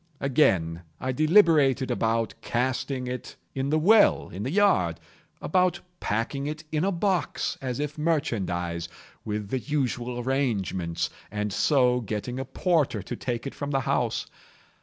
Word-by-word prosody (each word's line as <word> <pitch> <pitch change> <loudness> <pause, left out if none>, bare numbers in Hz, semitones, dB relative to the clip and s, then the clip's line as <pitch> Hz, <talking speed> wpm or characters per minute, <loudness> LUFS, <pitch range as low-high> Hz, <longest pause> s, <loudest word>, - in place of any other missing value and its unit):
Again, 95 - +2 0.2
I 130 - -1
deliberated 150 -4 +4
about 115 -1 0
casting 130 +1 -1
it 125 0 -6 0.2
in 135 +1 -2
the 155 - +3
well 205 +7 +5
in 95 - -7
the 120 - -2
yard—about 175 - 0 0.2
packing 115 +6 -2
it 155 +1 -5
in 155 +1 0
a 195 - +2
box, 185 -1 0
as 130 -1 -3
if 150 +1 -3
merchandise, 90 - -1 0.3
with 105 -1 -4
the 130 - 0
usual 125 -3 -2
arrangements, 95 - -1 0.2
and 105 0 -3
so 125 -1 +3
getting 110 +4 -4
a 135 - -3
porter 150 - +1
to - - -5
take 120 -1 -3
it 140 - -4
from 145 - -5
the 135 -1 +1
house. - - 0
130 Hz, 140 wpm, -26 LUFS, 105-150 Hz, 0.3 s, well